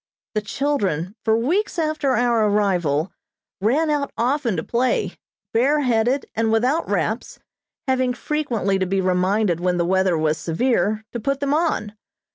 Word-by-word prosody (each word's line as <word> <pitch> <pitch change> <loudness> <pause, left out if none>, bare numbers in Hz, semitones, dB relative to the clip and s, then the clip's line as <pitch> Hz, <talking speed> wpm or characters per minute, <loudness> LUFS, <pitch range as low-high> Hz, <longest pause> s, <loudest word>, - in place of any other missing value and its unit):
The 215 - 0
children, 205 - -1
for 220 0 +3
weeks 355 - 0
after 310 -5 0
our 235 -3 +2
arrival, 180 -6 +1 0.5
ran 295 +10 +2
out 285 -2 -1
often 245 -3 0
to - - -2
play, 250 +2 0 0.4
bareheaded 255 0 +2
and 225 0 0
without 250 +9 +1
wraps, - - -2 0.5
having 255 -1 +1
frequently 235 -11 -1
to 185 - 0
be 195 +1 0
reminded 185 0 +1
when 180 0 0
the 170 - +1
weather 190 -1 +2
was 155 0 0
severe, 215 +5 0
to 240 - -4
put 275 +4 -1
them 280 0 0
on. 300 -10 0
225 Hz, 145 wpm, -22 LUFS, 190-275 Hz, 0.5 s, for